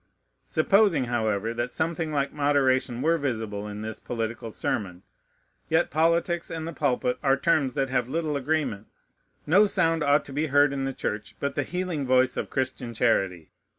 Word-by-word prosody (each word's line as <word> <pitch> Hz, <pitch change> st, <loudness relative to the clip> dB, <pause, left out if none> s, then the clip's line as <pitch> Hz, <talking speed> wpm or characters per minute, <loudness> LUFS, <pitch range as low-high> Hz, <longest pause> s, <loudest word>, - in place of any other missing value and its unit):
Supposing, 195 Hz, -1 st, +3 dB
however, 110 Hz, -2 st, -1 dB
that 120 Hz, +1 st, -3 dB
something 160 Hz, 0 st, -1 dB
like 140 Hz, -2 st, -1 dB
moderation 130 Hz, -4 st, +1 dB
were 165 Hz, +1 st, +2 dB
visible 110 Hz, -7 st, -3 dB
in 105 Hz, 0 st, -6 dB
this 110 Hz, 0 st, -6 dB
political 115 Hz, -1 st, -4 dB
sermon, 95 Hz, -4 st, -3 dB, 0.7 s
yet 160 Hz, +2 st, +2 dB
politics 170 Hz, +2 st, +1 dB
and 160 Hz, -1 st, -5 dB
the 165 Hz, -, -5 dB
pulpit 125 Hz, -4 st, 0 dB
are 135 Hz, -2 st, +3 dB
terms 140 Hz, -2 st, +1 dB
that 135 Hz, -2 st, -1 dB
have 125 Hz, -2 st, 0 dB
little 155 Hz, 0 st, -1 dB
agreement. 140 Hz, -7 st, -1 dB, 0.6 s
No 190 Hz, +7 st, +5 dB
sound 165 Hz, -4 st, +1 dB
ought 145 Hz, 0 st, +3 dB
to 135 Hz, -, -10 dB
be 150 Hz, +3 st, 0 dB
heard 145 Hz, 0 st, +4 dB
in 135 Hz, -1 st, -2 dB
the 135 Hz, -, -1 dB
church 105 Hz, -4 st, -4 dB
but 140 Hz, -, -2 dB
the -, -, 0 dB
healing 170 Hz, -2 st, -3 dB
voice 130 Hz, 0 st, +3 dB
of -, -, -3 dB
Christian 130 Hz, -2 st, -3 dB
charity. 95 Hz, -8 st, 0 dB
135 Hz, 170 wpm, -26 LUFS, 120-155 Hz, 0.7 s, No